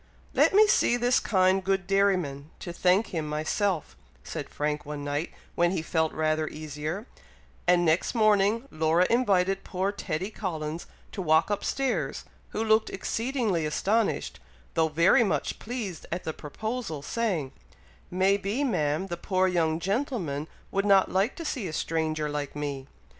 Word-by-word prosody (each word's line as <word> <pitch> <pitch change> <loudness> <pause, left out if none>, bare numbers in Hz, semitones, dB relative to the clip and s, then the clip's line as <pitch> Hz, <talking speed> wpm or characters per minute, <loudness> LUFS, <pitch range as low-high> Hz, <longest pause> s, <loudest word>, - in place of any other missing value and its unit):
"Let - - +4
me 430 +1 +8
see 245 - +3
this 245 +1 +3
kind 190 -1 +2
good 190 0 0
dairyman, 180 -8 +1
to 175 - -5
thank 185 +5 +2
him 160 -3 -2
myself," 160 +3 -1 0.3
said - - -6
Frank, 150 0 -2
one 145 0 -6
night, 145 +3 -2 0.2
when 175 0 +3
he 175 -3 -2
felt 160 -1 0
rather 155 0 0
easier; 155 +7 -5 0.6
and 175 0 +4
next 165 +8 +2
morning, 215 +2 +3
Laura 160 +3 +3
invited 195 -5 +2
poor 190 +2 -1
Teddy 190 -1 -3
Collins 160 -6 -4 0.2
to 200 - -4
walk 160 +2 +3
up 205 - -1
stairs, 270 -2 -1 0.2
who 220 - -2
looked 220 0 +3
exceedingly 225 - -1
astonished, 200 - 0 0.3
though 160 - +3
very 170 +8 +4
much 205 - -1
pleased 215 -8 -5
at 175 +2 -3
the 160 - -3
proposal, 190 - -5
saying, 180 - -1 0.6
"May 190 +2 +3
be, 205 +8 -2
Ma'am, 160 - 0
the 175 -3 -5
poor 185 +1 +1
young 165 -3 +1
gentleman 190 - -2 0.2
would 195 - +1
not 195 -2 +5
like 195 +6 +1
to 335 - -7
see 250 -10 -2
a 160 - -6
stranger 155 -1 -1
like 145 -1 -4
me!" 140 -2 -4
185 Hz, 155 wpm, -27 LUFS, 155-205 Hz, 0.6 s, me